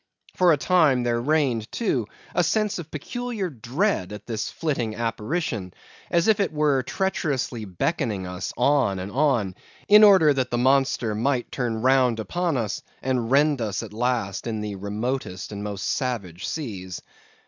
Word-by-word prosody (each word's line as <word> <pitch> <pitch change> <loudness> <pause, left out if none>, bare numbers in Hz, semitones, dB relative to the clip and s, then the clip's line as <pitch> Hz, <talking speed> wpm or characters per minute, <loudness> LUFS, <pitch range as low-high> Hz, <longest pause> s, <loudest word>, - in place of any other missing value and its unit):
For 180 -2 +5
a 155 - +4
time, 150 -6 +3
there 120 -1 0
reigned, 130 -6 +1
too, 130 - -1 0.3
a 180 - +2
sense 210 +4 0
of 160 -2 -8
peculiar 215 - -4
dread 125 - -1
at 105 0 -8
this 115 -3 -3
flitting 125 -9 -2
apparition, 115 - -3 0.3
as 170 +2 +2
if 220 -2 +4
it 200 - +1
were 150 -3 +2
treacherously 140 - -2
beckoning 100 - -2
us 90 +1 -5
on 140 -9 +3
and 95 +2 -5
on, 125 -9 +1 0.3
in 210 +1 +8
order 190 -8 +7
that 130 -2 -1
the 120 - -1
monster 130 -3 +2
might 120 +3 0
turn 115 -3 -2
round 130 -3 +3
upon 170 +6 -1
us, 110 -4 -2 0.2
and 125 -3 0
rend 145 0 +3
us 110 0 -2
at 105 -2 -9
last 115 -3 -1
in 110 -2 -2
the 105 -1 -4
remotest 100 0 -4
and 100 -1 -5
most 105 -2 -4
savage 100 -9 -2
seas. 95 - -5
125 Hz, 160 wpm, -24 LUFS, 105-155 Hz, 0.3 s, in